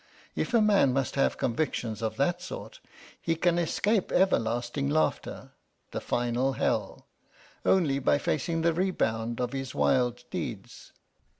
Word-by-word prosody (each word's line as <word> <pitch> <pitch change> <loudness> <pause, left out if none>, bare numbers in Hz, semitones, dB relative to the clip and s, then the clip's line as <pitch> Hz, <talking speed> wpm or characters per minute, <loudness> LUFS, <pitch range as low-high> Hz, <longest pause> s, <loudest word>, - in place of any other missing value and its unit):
If 250 - -1
a 230 - +6
man 200 -11 +4
must 135 -1 0
have 135 - +1
convictions 115 -4 -2
of 110 -1 -2
that 175 +6 +1
sort, - - -8 0.4
he 165 - 0
can 175 +1 +2
escape 195 +4 +1
everlasting 120 -5 +1
laughter 155 +2 -1 0.4
the - - -4
final 120 +2 0
hell - - -1 0.6
only 155 -8 +3
by 140 - +3
facing 165 +3 -1
the 170 0 +3
rebound 120 -11 -1
of 125 +1 -2
his 135 -1 -4
wild 125 -1 +2
deeds." - - -6
140 Hz, 135 wpm, -28 LUFS, 120-175 Hz, 0.6 s, a